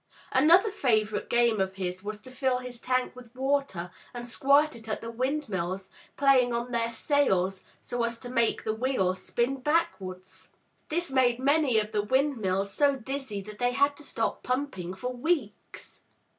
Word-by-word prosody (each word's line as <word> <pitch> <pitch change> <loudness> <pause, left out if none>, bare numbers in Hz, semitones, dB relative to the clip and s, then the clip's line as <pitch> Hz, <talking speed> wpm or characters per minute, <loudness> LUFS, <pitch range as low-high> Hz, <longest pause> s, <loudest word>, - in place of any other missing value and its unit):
Another 340 - +5
favorite 215 - 0
game 235 -3 +3
of 190 0 -1
his 185 0 -4
was 210 0 -5
to 255 - -13
fill 255 0 0
his 250 -1 -8
tank 255 0 -1
with 245 -1 -13
water, 265 -10 -1 0.2
and 240 0 -6
squirt 280 +5 +3
it 225 -1 -10
at 215 - -1
the 230 - -6
windmills, 205 - -2 0.3
playing 260 -4 +4
on 240 +1 -3
their 230 -1 0
sails 195 - +1 0.2
so 245 - -3
as 235 0 0
to 245 - -8
make 235 -2 +1
the 215 - -1
wheels 220 -6 0
spin 245 +3 -1
backwards. 250 - -2 0.4
This 345 0 -1
made 250 -3 +3
many 275 -2 +3
of 215 0 0
the 210 - +1
windmills 210 -6 0
so 285 -1 +3
dizzy 265 -4 -4
that 210 +1 -11
they 245 0 +1
had 280 +2 +3
to 295 - -11
stop 225 -5 -2
pumping 250 -9 -3
for 250 +6 -4
weeks. 250 -5 -3
245 Hz, 170 wpm, -28 LUFS, 210-275 Hz, 0.4 s, Another